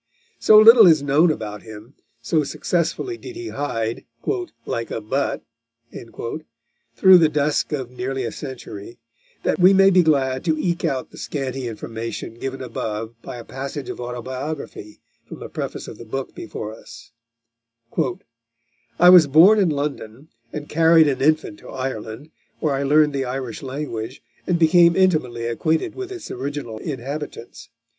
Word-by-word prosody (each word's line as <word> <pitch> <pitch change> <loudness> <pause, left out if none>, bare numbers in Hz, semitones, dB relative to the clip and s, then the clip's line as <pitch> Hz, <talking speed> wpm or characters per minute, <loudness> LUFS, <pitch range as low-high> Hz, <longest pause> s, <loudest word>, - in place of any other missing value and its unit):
So 215 - +6
little 220 -1 +9
is 155 -4 +5
known 145 +5 +4
about 105 -8 -4
him, 110 +3 -12 0.3
so 155 +6 +1
successfully 175 - -2
did 370 - -9
he 355 0 -6
hide 115 -6 -3 0.6
"like 115 0 -3
a - - -3
but" 130 +6 -2 1.5
through 190 +5 +7
the 160 -2 +4
dusk 150 0 0
of 130 -5 -4
nearly 130 +1 -3
a 115 - -3
century, 120 -5 -9 0.5
that - - 0
we 185 +2 +7
may 195 0 +6
be 185 -1 +5
glad 135 -5 +1
to 160 -2 +1
eke 170 +2 -2
out 135 -5 -2
the - - -12
scanty 135 -3 -4
information 115 0 -6
given 135 0 -5
above 110 -2 -5
by - - -8
a 120 - -8
passage 135 +2 -6
of - - -9
autobiography 125 -2 -6 0.3
from - - -9
the - - -9
preface - - -5
of - - -10
the - - -8
book 135 +4 -5
before 110 0 -7
us: 110 - -14 1.9
"I 180 - +8
was 175 -5 +8
born 175 +10 +6
in 190 -4 +3
London, 145 -2 -4 0.2
and 150 -1 -6
carried 165 0 +5
an 135 -2 -1
infant 150 -7 +1
to - - -13
Ireland, 130 +2 -6 0.3
where 150 -3 0
I 135 - -1
learned 150 +1 +3
the 135 -1 -1
Irish 125 -2 -5
language, 130 -3 -6 0.2
and 175 - +2
became 170 +1 +5
intimately 155 -11 +1
acquainted 160 - -1
with 385 0 -7
its 360 -4 -8
original 130 -4 -5
inhabitants. 140 -2 -7
140 Hz, 155 wpm, -22 LUFS, 120-160 Hz, 1.9 s, little